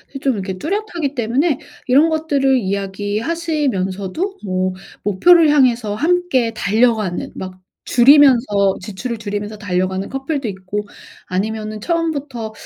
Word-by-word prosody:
이 -, -, -4 dB
좀 270 Hz, -2 st, +1 dB
이렇게 190 Hz, -2 st, -4 dB
뚜렷하기 340 Hz, -, -3 dB
때문에 260 Hz, +5 st, +1 dB, 0.3 s
이런 290 Hz, +6 st, +5 dB
것들을 285 Hz, -4 st, +1 dB
이야기하시면서도 205 Hz, -, -2 dB
뭐 185 Hz, -1 st, -1 dB, 0.3 s
목표를 315 Hz, -, +5 dB
향해서 245 Hz, -7 st, +3 dB
함께 320 Hz, -4 st, +1 dB
달려가는 220 Hz, -3 st, 0 dB
막 185 Hz, 0 st, -7 dB, 0.3 s
줄이면서 240 Hz, -7 st, +5 dB
지출을 215 Hz, +4 st, -5 dB
줄이면서 210 Hz, 0 st, -5 dB
달려가는 185 Hz, 0 st, -2 dB
커플도 270 Hz, -1 st, -3 dB
있고 200 Hz, +1 st, -5 dB, 0.4 s
아니면은 215 Hz, +3 st, -3 dB
처음부터 285 Hz, -8 st, -2 dB
230 Hz, 320 characters per minute, -18 LUFS, 200-290 Hz, 0.4 s, 이런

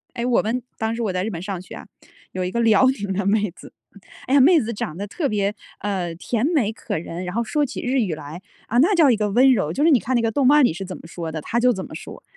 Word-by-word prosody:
诶， 235 Hz, 0 st, -2 dB
我 250 Hz, -, +3 dB
们 240 Hz, +4 st, -2 dB, 0.2 s
当 220 Hz, +1 st, -2 dB
时 235 Hz, -, -4 dB
我 210 Hz, -4 st, -1 dB
在 185 Hz, 0 st, -1 dB
日 220 Hz, -, -2 dB
本 170 Hz, -4 st, -6 dB
上 190 Hz, -2 st, -4 dB
学 -, -, -11 dB
啊。 -, -, -10 dB, 0.5 s
有 185 Hz, 0 st, -2 dB
一 180 Hz, -, -2 dB
个 235 Hz, -, -2 dB
辽 225 Hz, +2 st, +5 dB
宁 205 Hz, -7 st, -1 dB
的 200 Hz, +1 st, -1 dB
妹 210 Hz, -2 st, +1 dB
子， -, -, -14 dB, 0.5 s
哎 260 Hz, -, -1 dB
呀， 285 Hz, -, +6 dB
妹 325 Hz, +4 st, +6 dB
子 230 Hz, -1 st, -3 dB
长 160 Hz, -5 st, -5 dB
得 200 Hz, -, -4 dB
特 280 Hz, -, -2 dB
别， 205 Hz, -1 st, 0 dB, 0.3 s
呃， 185 Hz, -5 st, -3 dB
甜 225 Hz, +6 st, -2 dB
美 250 Hz, -11 st, +1 dB
可 -, -, -4 dB
人， 170 Hz, +2 st, -6 dB
然 180 Hz, +3 st, -5 dB
后 235 Hz, -, +1 dB
说 295 Hz, +6 st, 0 dB
起 280 Hz, -, -4 dB
日 260 Hz, +1 st, 0 dB
语 185 Hz, -9 st, -1 dB
来， 155 Hz, +4 st, -9 dB, 0.3 s
啊 240 Hz, +3 st, +1 dB
那 370 Hz, +8 st, +4 dB
叫 300 Hz, -6 st, +5 dB
一 -, -, +3 dB
个 210 Hz, -1 st, -1 dB
温 255 Hz, +5 st, +5 dB
柔。 155 Hz, -9 st, 0 dB
就 285 Hz, -, -1 dB
是 325 Hz, -, +5 dB
你 255 Hz, -, +5 dB
看 255 Hz, +1 st, -2 dB
那 235 Hz, -, +3 dB
个 225 Hz, -1 st, 0 dB
动 275 Hz, +2 st, +1 dB
漫 295 Hz, 0 st, +6 dB
里 160 Hz, -, +1 dB
是 195 Hz, +3 st, -6 dB
怎 185 Hz, -1 st, -7 dB
么 -, -, -16 dB
说 165 Hz, -1 st, -6 dB
的， 155 Hz, -, -4 dB
她 235 Hz, +8 st, -1 dB
就 250 Hz, +1 st, +4 dB
怎 190 Hz, -4 st, -4 dB
么 -, -, -12 dB
说。 -, -, -9 dB
220 Hz, 320 characters per minute, -22 LUFS, 185-250 Hz, 0.5 s, 呀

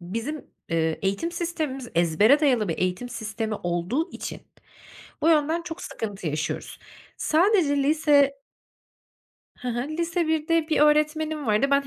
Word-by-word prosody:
bizim, 230 Hz, -, -5 dB, 0.2 s
eee, 160 Hz, -1 st, 0 dB
eğitim 200 Hz, -, -1 dB
sistemimiz 315 Hz, -7 st, -3 dB
ezbere 190 Hz, -, +4 dB
dayalı 245 Hz, -, +2 dB
bir 165 Hz, -, -2 dB
eğitim 185 Hz, +7 st, -1 dB
sistemi 220 Hz, -2 st, -4 dB
olduğu 175 Hz, -, -2 dB
için, -, -, -7 dB, 0.8 s
bu 320 Hz, -, +4 dB
yönden 320 Hz, +1 st, +3 dB
çok 335 Hz, -1 st, -7 dB
sıkıntı 200 Hz, -6 st, -5 dB
yaşıyoruz. 150 Hz, +1 st, -4 dB, 0.4 s
Sadece 330 Hz, -3 st, +3 dB
lise 285 Hz, -1 st, +4 dB, 1.3 s
Hı 250 Hz, -, -5 dB
hı. 240 Hz, +3 st, -2 dB
Lise 335 Hz, +2 st, -1 dB
1'de 320 Hz, +1 st, +1 dB
bir 310 Hz, -, +2 dB
öğretmenim 305 Hz, 0 st, +2 dB
vardı. 215 Hz, +5 st, +3 dB
Ben 280 Hz, 0 st, +3 dB
280 Hz, 130 wpm, -25 LUFS, 210-315 Hz, 1.3 s, ezbere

